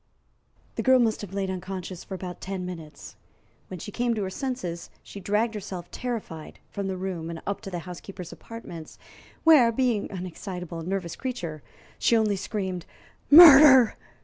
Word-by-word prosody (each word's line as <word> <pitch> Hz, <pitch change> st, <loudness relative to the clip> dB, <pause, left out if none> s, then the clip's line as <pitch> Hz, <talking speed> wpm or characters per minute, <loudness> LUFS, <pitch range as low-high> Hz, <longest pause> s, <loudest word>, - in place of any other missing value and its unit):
The -, -, 0 dB
girl 260 Hz, 0 st, +5 dB
must 230 Hz, -3 st, +1 dB
have 205 Hz, -3 st, -8 dB
lain 195 Hz, -1 st, -2 dB
unconscious 185 Hz, -1 st, -6 dB
for 190 Hz, -, -7 dB
about 180 Hz, -1 st, -7 dB
ten 190 Hz, -1 st, -5 dB
minutes. 160 Hz, -5 st, -9 dB, 0.5 s
When 185 Hz, -, -7 dB
she 205 Hz, -, -7 dB
came 240 Hz, +1 st, 0 dB
to 210 Hz, -, -2 dB
her 190 Hz, -, -4 dB
senses, 190 Hz, -9 st, -5 dB
she 200 Hz, -, -10 dB
dragged 210 Hz, +4 st, 0 dB
herself, 190 Hz, -4 st, -7 dB
terrified, 225 Hz, -11 st, -6 dB
from 200 Hz, -1 st, -4 dB
the 190 Hz, -1 st, -3 dB
room 180 Hz, -3 st, -4 dB
and 165 Hz, -1 st, -6 dB
up 200 Hz, 0 st, -3 dB
to 200 Hz, -, -7 dB
the 180 Hz, -, -4 dB
housekeeper's 180 Hz, 0 st, -9 dB
apartments, 175 Hz, -9 st, -10 dB, 0.5 s
where, 295 Hz, -8 st, +6 dB
being 235 Hz, -3 st, 0 dB
an 185 Hz, -2 st, -6 dB
excitable 180 Hz, -1 st, -7 dB
and 165 Hz, -, -7 dB
nervous 185 Hz, -3 st, -3 dB
creature, 175 Hz, -, -5 dB, 0.4 s
she 235 Hz, -, +3 dB
only 215 Hz, -2 st, +1 dB
screamed 190 Hz, -2 st, -4 dB, 0.4 s
"Murder!" 285 Hz, -6 st, +9 dB
195 Hz, 170 wpm, -26 LUFS, 180-230 Hz, 0.5 s, Murder